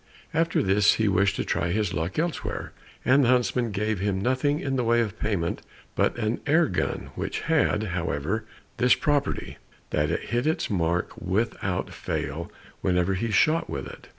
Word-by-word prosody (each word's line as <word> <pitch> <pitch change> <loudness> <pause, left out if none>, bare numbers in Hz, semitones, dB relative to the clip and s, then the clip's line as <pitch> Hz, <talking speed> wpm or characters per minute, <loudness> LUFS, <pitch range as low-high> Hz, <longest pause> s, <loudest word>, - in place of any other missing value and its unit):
After 165 +1 +2
this 100 +1 +4
he 110 - +1
wished 100 0 +3
to - - -2
try 85 - 0
his 105 +1 0
luck 80 +4 -2
elsewhere, 165 +1 -2 0.3
and 135 +2 +5
the - - +3
huntsman 125 -1 +2
gave 105 0 -1
him 100 -1 0
nothing 130 +7 +1
in 135 -1 -2
the 125 - +1
way 120 0 +3
of 110 -2 -2
payment 95 -6 -1 0.3
but - - +1
an 110 0 -1
air 160 +4 +5
gun, - - -2
which - - -3
had, 155 -9 +2
however, 90 +1 -2 0.3
this 125 0 +5
property, 145 -1 -1 0.3
that 75 0 +1
it - - -2
hit 120 +4 0
its 160 - 0
mark 85 -2 0
without 95 -1 -1
fail 75 +5 -4 0.3
whenever 90 +1 +2
he 115 +5 -1
shot 155 +10 +3
with - - -4
it. - - -11
110 Hz, 175 wpm, -26 LUFS, 95-125 Hz, 0.3 s, and